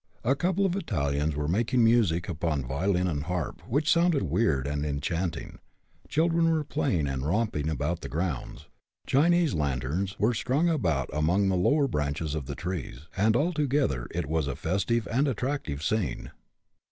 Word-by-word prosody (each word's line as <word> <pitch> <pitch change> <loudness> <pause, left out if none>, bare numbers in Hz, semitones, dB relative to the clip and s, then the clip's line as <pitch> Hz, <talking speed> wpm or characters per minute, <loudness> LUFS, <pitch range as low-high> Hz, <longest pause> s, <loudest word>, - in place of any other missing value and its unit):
A 130 - +3
couple 185 +5 +1
of 185 -1 +1
Italians 75 - -1
were 75 0 -2
making 115 - +2
music 110 -8 +3
upon 80 -5 -2
violin 90 +8 0
and 75 -4 -2
harp, 90 -3 -3
which 145 +5 0
sounded 170 - +3
weird 80 - +1
and 70 0 -2
enchanting; 80 +4 -3 0.5
children 165 +2 +2
were 160 -2 +1
playing 135 - 0
and 65 -1 -2
romping 80 -2 0
about 75 -5 -2
the - - -6
grounds; 75 -1 -3 0.4
Chinese 170 - +3
lanterns 75 +5 -1
were 110 +4 +2
strung 130 +8 +1
about 85 - 0
among 90 +7 +2
the 95 - +1
lower 140 +11 +3
branches 75 - -2
of 75 -4 -4
the 70 - -4
trees, 85 -8 -5
and 110 +3 +3
altogether 145 - +1
it - - -3
was 80 0 -1
a 70 - -2
festive 100 +6 0
and 135 +6 +2
attractive 125 - -2
scene. 110 +3 -1
90 Hz, 160 wpm, -28 LUFS, -, 0.5 s, A